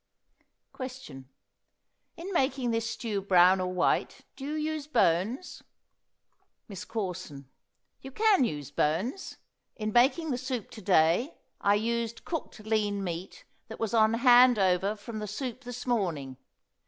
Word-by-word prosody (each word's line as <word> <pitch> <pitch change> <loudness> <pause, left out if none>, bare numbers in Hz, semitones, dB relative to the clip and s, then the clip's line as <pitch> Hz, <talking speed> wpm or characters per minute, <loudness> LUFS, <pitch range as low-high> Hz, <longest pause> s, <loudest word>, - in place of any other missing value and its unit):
Question. 250 - -8 0.9
In 370 +4 -6
making 265 -5 +1
this 225 0 -1
stew 220 -4 -3
brown 185 -1 +5
or 180 0 -2
white 180 -1 0
do 270 - -8
you 310 0 -1
use 300 -2 -6
bones? 225 - 0 1.1
MISS 195 -5 -8
CORSON. 180 - -5 0.5
You 265 - -8
can 415 +2 +3
use 145 - -3
bones. 185 - -1 0.4
In 215 -1 -4
making 285 +6 +3
the 250 - -1
soup 255 -4 -4
to 220 - -10
day 180 - +2 0.3
I 200 0 +4
used 230 +1 -2
cooked 320 -8 -5
lean 210 -2 -1
meat 180 - -6 0.2
that - - -9
was 225 0 -2
on 220 0 +4
hand 245 0 +6
over 190 +1 +2
from 215 +1 -8
the 210 - -5
soup 250 +4 -5
this 245 0 -7
morning. 165 - -2
220 Hz, 140 wpm, -28 LUFS, 185-255 Hz, 1.1 s, hand